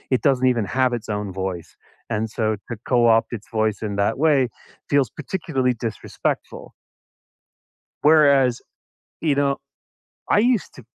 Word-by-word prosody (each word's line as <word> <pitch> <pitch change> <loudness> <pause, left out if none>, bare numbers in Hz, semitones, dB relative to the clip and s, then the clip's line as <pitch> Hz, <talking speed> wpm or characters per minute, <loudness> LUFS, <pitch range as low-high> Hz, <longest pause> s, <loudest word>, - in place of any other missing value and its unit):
it - - -1
doesn't 130 -1 +3
even 115 -4 -1
have 130 -1 +4
its 110 -1 -12
own 105 0 -3
voice, 95 -3 -4 0.4
and 105 +1 -1
so 110 0 -2 0.2
to 115 - -3 0.2
co-opt 120 -2 +4
its 105 - -20
voice 110 -1 +1
in 100 - -4
that 110 +4 +1
way 150 -2 +4 0.5
feels 140 -5 +3
particularly 145 -6 -1
disrespectful. 110 - -4 1.4
Whereas, 140 -5 +5 0.6
you 150 -4 +2
know, 140 -1 +1 0.7
I - - +5
used 235 -1 +1
to 130 - -13
130 Hz, 135 wpm, -22 LUFS, 110-145 Hz, 1.4 s, Whereas